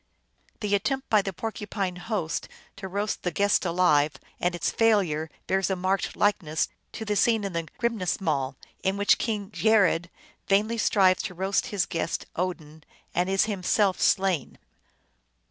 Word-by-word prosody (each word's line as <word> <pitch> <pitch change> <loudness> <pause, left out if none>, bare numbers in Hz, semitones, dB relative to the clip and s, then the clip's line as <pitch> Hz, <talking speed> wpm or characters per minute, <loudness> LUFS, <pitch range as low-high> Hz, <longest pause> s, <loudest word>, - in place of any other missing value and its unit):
The 205 -2 -1
attempt 265 +7 -1
by 215 -2 +6
the 195 - -4
Porcupine 200 -2 -4
host 180 -3 -3 0.3
to 195 -1 -6
roast 200 +3 -2
the 180 - -1
guest 200 +3 +2
alive 155 -4 +3 0.3
and 175 0 0
its 175 - -1
failure 185 -9 +2 0.2
bears 190 0 +1
a 190 - +1
marked 185 +2 -1
likeness 170 -7 +1 0.2
to 220 - -6
the 210 -1 0
scene 220 +1 +3
in 195 -2 -3
the 165 -1 -2
Grimnismal, 175 - -1 0.3
in 190 +1 0
which 205 0 +4
King 210 -4 -2
Geirrod 200 -6 +3 0.4
vainly 215 +4 +2
strives 190 -3 +4
to 180 - -6
roast 190 +2 0
his 200 -3 0
guest, 165 -2 -3
Odin, 160 -4 -4 0.3
and 180 +1 +1
is 195 +2 +3
himself 200 -1 +1
slain. 190 -8 +1
190 Hz, 150 wpm, -26 LUFS, 175-205 Hz, 0.4 s, by